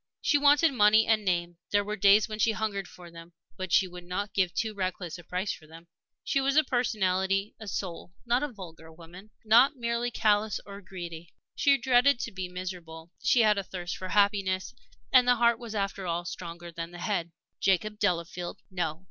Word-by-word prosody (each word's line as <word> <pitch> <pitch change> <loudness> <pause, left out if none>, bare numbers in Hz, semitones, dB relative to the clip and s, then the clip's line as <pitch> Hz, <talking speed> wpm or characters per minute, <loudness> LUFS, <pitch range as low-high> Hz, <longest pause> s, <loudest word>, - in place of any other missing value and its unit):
She 290 - +2
wanted 290 +2 +5
money 215 -1 +5
and 220 -1 +2
name; 175 -2 -1
there 205 -1 +2
were 210 +1 -4
days 200 +2 +5
when 215 -1 -6
she 220 +1 +3
hungered 205 -3 -3
for 175 -1 -13
them. 165 0 -13 0.2
But 185 -2 -6
she 190 - +4
would 180 0 -10
not 190 +4 -4
give 185 -3 +1
too 220 +3 -2
reckless 185 -3 -4
a - - -12
price 185 +4 -2
for 155 - -14
them. 165 +2 -14 0.4
She 275 - 0
was 275 +1 +1
a 310 - +6
personality, 195 -6 0
a 220 - -9
soul 180 -3 -5
not 240 +2 +2
a 295 -2 -3
vulgar 165 -6 -11
woman 175 +5 -14 0.2
not 240 +7 +5
merely 235 -1 -1
callous 215 -2 +1
or 200 0 -10
greedy. 170 -3 -9 0.2
She 280 -1 +4
dreaded 250 +1 +3
to 230 - -4
be 185 -2 -5
miserable; 175 -3 -8
she 240 +1 +4
had 210 -2 +4
a - - -3
thirst 175 -2 -6
for 185 - -6
happiness, 195 - +1 0.4
and 250 -1 +6
the 245 - +5
heart 235 0 +3
was, 230 -3 -8
after 195 -2 -2
all, 170 +1 -2
stronger 170 0 -7
than 165 0 -6
the 175 - -11
head. 175 -2 -2 0.3
Jacob 210 +2 +1
Delafield? 175 -2 -2
No! 170 -4 -2
195 Hz, 200 wpm, -28 LUFS, 175-220 Hz, 0.4 s, a